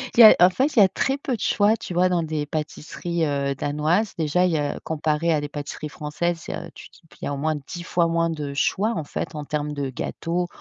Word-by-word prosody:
il -, -, +1 dB
y -, -, +12 dB
a 215 Hz, -, +10 dB
en 180 Hz, +1 st, +7 dB
fait, 270 Hz, +8 st, 0 dB
il -, -, +5 dB
y -, -, +9 dB
a -, -, +6 dB
très 270 Hz, +8 st, -1 dB
peu 265 Hz, -3 st, -2 dB
de -, -, -9 dB
choix, 210 Hz, +2 st, +3 dB
tu 180 Hz, -5 st, -7 dB
vois 180 Hz, +1 st, +4 dB
dans 175 Hz, -2 st, +1 dB
des 155 Hz, -2 st, -2 dB
pâtisseries, 160 Hz, +2 st, -3 dB
heu, 140 Hz, -1 st, -1 dB
danoises. 155 Hz, +10 st, 0 dB
Déjà, 165 Hz, +4 st, +2 dB
il 180 Hz, -, +2 dB
y 155 Hz, -, +1 dB
a 145 Hz, 0 st, -2 dB
comparé 160 Hz, +1 st, 0 dB
à 150 Hz, -, +1 dB
des 145 Hz, -, -5 dB
pâtisseries 150 Hz, +1 st, -6 dB
françaises, 165 Hz, +3 st, -3 dB, 0.3 s
tu -, -, -11 dB
dis -, -, -20 dB
p -, -, -19 dB
il -, -, -1 dB
y -, -, -2 dB
au 140 Hz, -, -3 dB
moins 155 Hz, +2 st, 0 dB
10 150 Hz, +5 st, -7 dB
fois 170 Hz, 0 st, +1 dB
moins 165 Hz, 0 st, +1 dB
de 150 Hz, -3 st, -4 dB
choix 205 Hz, +10 st, +1 dB
en 160 Hz, -, -2 dB
fait, 155 Hz, -, -5 dB
en 150 Hz, -1 st, -5 dB
termes 150 Hz, 0 st, -2 dB
de 140 Hz, -2 st, -3 dB
gâteaux. 170 Hz, +7 st, -3 dB
160 Hz, 260 wpm, -24 LUFS, 150-180 Hz, 0.3 s, y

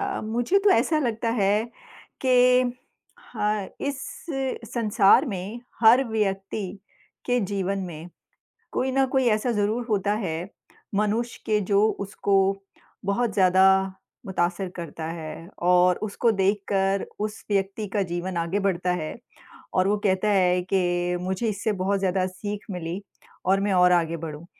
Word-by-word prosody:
अ, 395 Hz, -1 st, -2 dB
मुझे 240 Hz, -, +1 dB
तो 400 Hz, 0 st, +3 dB
ऐसा 305 Hz, +3 st, +3 dB
लगता 230 Hz, -4 st, -1 dB
है 210 Hz, -1 st, +2 dB, 0.6 s
कि 250 Hz, 0 st, +5 dB, 0.6 s
हा 210 Hz, -2 st, -2 dB, 0.2 s
इस 280 Hz, -1 st, -3 dB, 0.7 s
संसार 215 Hz, -2 st, +4 dB
में 205 Hz, +1 st, -5 dB, 0.2 s
हर 230 Hz, +3 st, +7 dB
व्यक्ति 195 Hz, -2 st, -2 dB, 0.5 s
के 245 Hz, 0 st, +2 dB
जीवन 195 Hz, -1 st, -2 dB
में, 170 Hz, -2 st, -7 dB, 0.6 s
कोई 265 Hz, -, 0 dB
ना 270 Hz, +1 st, +3 dB
कोई 265 Hz, 0 st, +1 dB
ऐसा 230 Hz, +3 st, -1 dB
ज़रूर 215 Hz, +3 st, 0 dB
होता 205 Hz, -1 st, +1 dB
है 165 Hz, +1 st, -3 dB, 0.5 s
मनुष्य 215 Hz, +4 st, -1 dB
के 210 Hz, -1 st, +2 dB
जो 200 Hz, +1 st, +2 dB, 0.2 s
उसको 200 Hz, 0 st, 0 dB, 0.7 s
बहुत 210 Hz, +4 st, 0 dB
ज़्यादा 190 Hz, -1 st, +5 dB, 0.6 s
मुतासिर 180 Hz, 0 st, -1 dB
करता 165 Hz, -2 st, -6 dB
है 165 Hz, 0 st, -7 dB, 0.2 s
और 180 Hz, 0 st, +4 dB
उसको 215 Hz, +3 st, +1 dB
देखकर 195 Hz, -1 st, +1 dB
उस 210 Hz, 0 st, -4 dB
व्यक्ति 195 Hz, +1 st, -1 dB
का 205 Hz, 0 st, 0 dB
जीवन 175 Hz, 0 st, -4 dB
आगे 170 Hz, +4 st, -1 dB
बढ़ता 180 Hz, -2 st, 0 dB
है 155 Hz, -, -5 dB, 0.6 s
और 185 Hz, +1 st, +3 dB
वो 210 Hz, -, +2 dB
कहता 190 Hz, +2 st, +2 dB
है 180 Hz, -3 st, +3 dB
कि 175 Hz, -1 st, +1 dB
मुझे 190 Hz, +5 st, -2 dB
इससे 210 Hz, +1 st, -1 dB
बहुत 200 Hz, +1 st, +1 dB
ज़्यादा 185 Hz, -1 st, +1 dB
सीख 205 Hz, +3 st, -6 dB
मिली 180 Hz, +1 st, -4 dB, 0.4 s
और 195 Hz, +2 st, +3 dB
मैं 200 Hz, 0 st, 0 dB
और 180 Hz, -1 st, +5 dB
आगे 170 Hz, -1 st, +2 dB
बढ़ूँ। 160 Hz, 0 st, -7 dB
195 Hz, 140 wpm, -25 LUFS, 180-220 Hz, 0.7 s, हर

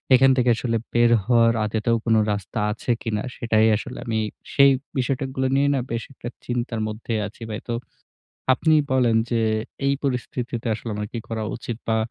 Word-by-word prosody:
এখান 135 Hz, +1 st, +6 dB
থেকে 125 Hz, -1 st, +3 dB
আসলে 115 Hz, -1 st, 0 dB, 0.2 s
বের 120 Hz, 0 st, +4 dB
হওয়ার 115 Hz, -2 st, +4 dB
আদতেও 110 Hz, +2 st, +1 dB
কোন 115 Hz, -, +3 dB, 0.2 s
রাস্তা 100 Hz, +2 st, -4 dB
আছে 110 Hz, +3 st, -2 dB
কী -, -, -3 dB
না? 105 Hz, -, -3 dB
সেটাই 110 Hz, -2 st, +3 dB
আসলে 125 Hz, +4 st, -7 dB
আমি 110 Hz, -1 st, 0 dB, 0.3 s
সেই 140 Hz, 0 st, +7 dB, 0.3 s
বিষয়গুলো 130 Hz, +1 st, -1 dB
নিয়ে 140 Hz, +1 st, +3 dB
না -, -, +1 dB
বেশ 115 Hz, 0 st, -2 dB
একটা 120 Hz, -, -7 dB, 0.2 s
চিন্তার 120 Hz, -2 st, -2 dB
মধ্যে 110 Hz, +2 st, -5 dB
আছি 105 Hz, -, -15 dB
ভাই। 105 Hz, -, -4 dB
তো -, -, 0 dB, 0.8 s
আপনি 155 Hz, +4 st, +3 dB, 0.2 s
বলেন 125 Hz, -3 st, +3 dB
যে 120 Hz, -, +2 dB, 0.5 s
এই 140 Hz, -, +3 dB
পরিস্থিতিতে 125 Hz, -2 st, -3 dB
আসলে 115 Hz, -, -6 dB
আমার 105 Hz, 0 st, -3 dB
কী 115 Hz, -, -3 dB
করা 110 Hz, -1 st, -3 dB
উচিত? 120 Hz, -1 st, -5 dB
বা 110 Hz, -, +3 dB
120 Hz, 180 wpm, -23 LUFS, 110-125 Hz, 0.8 s, সেই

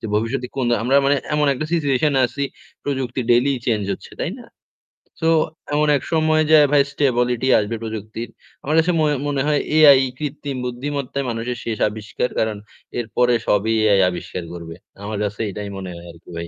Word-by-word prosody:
যে 110 Hz, -, -5 dB
ভবিষ্যতে 115 Hz, +4 st, -1 dB, 0.4 s
আমরা 130 Hz, +4 st, +3 dB
মানে 140 Hz, +1 st, +3 dB, 0.2 s
এমন 150 Hz, -1 st, +2 dB
একটা 155 Hz, +4 st, -3 dB
situation 145 Hz, -3 st, +2 dB
এ -, -, +4 dB
আছি 140 Hz, +3 st, -3 dB, 0.4 s
প্রযুক্তি 130 Hz, -3 st, -2 dB
daily 125 Hz, +4 st, +4 dB
change 105 Hz, -4 st, 0 dB
হচ্ছে। -, -, -9 dB
তাই -, -, -1 dB
না? -, -, -12 dB, 0.8 s
সো 160 Hz, -, +1 dB, 0.5 s
এমন 150 Hz, +1 st, +2 dB
এক 130 Hz, -, -8 dB
সময় 155 Hz, 0 st, +3 dB
যায় 150 Hz, -2 st, +8 dB
ভাই 145 Hz, -1 st, +6 dB
stability 125 Hz, -3 st, +1 dB
আসবে 105 Hz, +2 st, -2 dB
প্রযুক্তির। 110 Hz, +1 st, -6 dB, 0.3 s
আমার 150 Hz, +2 st, 0 dB
কাছে 165 Hz, +2 st, +2 dB
মনে 150 Hz, -1 st, +2 dB
মনে 140 Hz, -2 st, 0 dB
হয় 150 Hz, -1 st, +2 dB, 0.2 s
AI 145 Hz, -4 st, +8 dB, 0.2 s
কৃত্রিম 145 Hz, -2 st, -4 dB
বুদ্ধিমত্তায় 140 Hz, +2 st, -3 dB
মানুষের 120 Hz, +1 st, -3 dB
শেষ 110 Hz, -2 st, -2 dB
আবিষ্কার। 110 Hz, +3 st, -3 dB
কারণ 110 Hz, -1 st, 0 dB, 0.4 s
এরপরে 120 Hz, +2 st, +1 dB
সবই 105 Hz, +2 st, +2 dB, 0.2 s
AI 100 Hz, -, +5 dB
আবিষ্কার 90 Hz, 0 st, -6 dB
করবে। 85 Hz, -1 st, -8 dB, 0.3 s
আমার 105 Hz, 0 st, -4 dB
কাছে 105 Hz, 0 st, -4 dB
এটাই 100 Hz, +1 st, -6 dB
মনে 95 Hz, -1 st, -6 dB
হয় 85 Hz, 0 st, -11 dB
আরকি 85 Hz, +1 st, -18 dB
ভাই। 85 Hz, -, -5 dB
125 Hz, 175 wpm, -21 LUFS, 110-145 Hz, 0.8 s, যায়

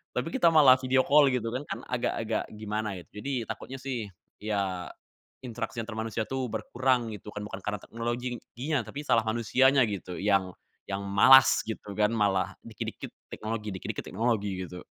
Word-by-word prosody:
Tapi -, -, -1 dB
kita 205 Hz, -11 st, +5 dB
malah 145 Hz, -5 st, +8 dB
video 130 Hz, 0 st, +2 dB
call, 145 Hz, -1 st, +6 dB
gitu, 115 Hz, -3 st, -1 dB
kan, 130 Hz, -, -2 dB
kan, -, -, -3 dB
agak-agak 115 Hz, -2 st, -1 dB
gimana 105 Hz, -2 st, -3 dB
gitu. 105 Hz, +5 st, -11 dB
Jadi 130 Hz, -5 st, -2 dB
takutnya 135 Hz, -, -6 dB
sih, 125 Hz, -6 st, -3 dB, 0.3 s
ya 100 Hz, -4 st, -2 dB, 0.5 s
interaksi 120 Hz, -2 st, -5 dB
antar 110 Hz, 0 st, -7 dB
manusia 110 Hz, 0 st, -2 dB
tuh 130 Hz, -2 st, -2 dB
berkurang, 125 Hz, -1 st, 0 dB
gitu 105 Hz, 0 st, -9 dB
kan, 105 Hz, -, -5 dB
bukan 100 Hz, -2 st, -7 dB
karena 105 Hz, 0 st, -2 dB
teknologinya 120 Hz, +4 st, -3 dB
tapi 145 Hz, -, -6 dB
salah 115 Hz, -, +4 dB
manusianya, 125 Hz, +4 st, +4 dB
gitu, 90 Hz, -3 st, -5 dB
yang 95 Hz, -2 st, +1 dB, 0.4 s
yang 100 Hz, 0 st, -3 dB
malas, 130 Hz, +7 st, +7 dB
gitu 105 Hz, -2 st, -6 dB
kan, 105 Hz, 0 st, +4 dB
malah 100 Hz, -3 st, +1 dB
dikit-dikit 110 Hz, -3 st, -6 dB, 0.2 s
teknologi 110 Hz, -1 st, -4 dB
dikit-dikit 95 Hz, -, -5 dB
teknologi, 105 Hz, -5 st, -1 dB
gitu. 90 Hz, -, -9 dB
115 Hz, 160 wpm, -28 LUFS, 105-130 Hz, 0.5 s, malah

